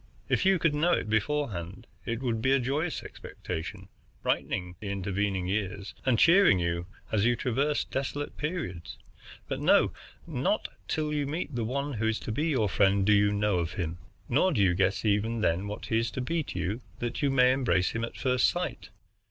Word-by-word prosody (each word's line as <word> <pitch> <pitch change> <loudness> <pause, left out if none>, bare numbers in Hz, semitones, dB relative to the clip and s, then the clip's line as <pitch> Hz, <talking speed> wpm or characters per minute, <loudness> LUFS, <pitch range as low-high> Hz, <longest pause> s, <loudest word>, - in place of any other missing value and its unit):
If - - +2
you 195 -1 +5
could 165 -2 +2
know 165 +4 +2
it 110 - -1
beforehand, 110 - -1 0.2
it 115 +2 -2
would 115 -3 -1
be 130 +3 +3
a 135 - +4
joyous 145 +7 -1
expectation, 95 +4 -7 0.4
brightening 90 -1 -1
the 105 - -5
intervening 100 -1 -1
years 100 0 -3
and 125 -3 +4
cheering 170 - +6
you 85 0 -1 0.2
as 105 -2 +2
you 120 +1 +3
traversed 140 +5 0
desolate 140 +2 -3
periods. 150 - -4 0.5
But - - -3
no; - - +4 0.3
not - - -1 0.2
till 150 -1 -1
you 145 -2 0
meet 155 +2 -3
the 120 -2 -1
one 140 +4 -2
who 110 -1 -1
is 110 0 0
to - - -4
be 150 +9 0
your 130 -9 +2
friend 100 0 +3
do 105 - +5
you 100 0 +4
know 105 -2 +1
of 85 -1 -2
him. 85 -1 -3 0.3
Nor 160 +9 +3
do 105 -7 +3
you 90 -2 +4
guess 95 +3 +1
even 110 +2 +1
then 95 +1 +1
what 105 - -6
he 110 - +1
is 115 +1 -1
to 130 - -2
be 165 +6 -1
to - - -6
you, 95 +7 -2 0.2
that 120 0 -3
you 140 - +2
may 125 -1 +5
embrace 120 -9 +2
him 115 - -3
at 115 - -5
first 125 -1 +3
sight. - - -4
110 Hz, 200 wpm, -28 LUFS, 95-140 Hz, 0.5 s, cheering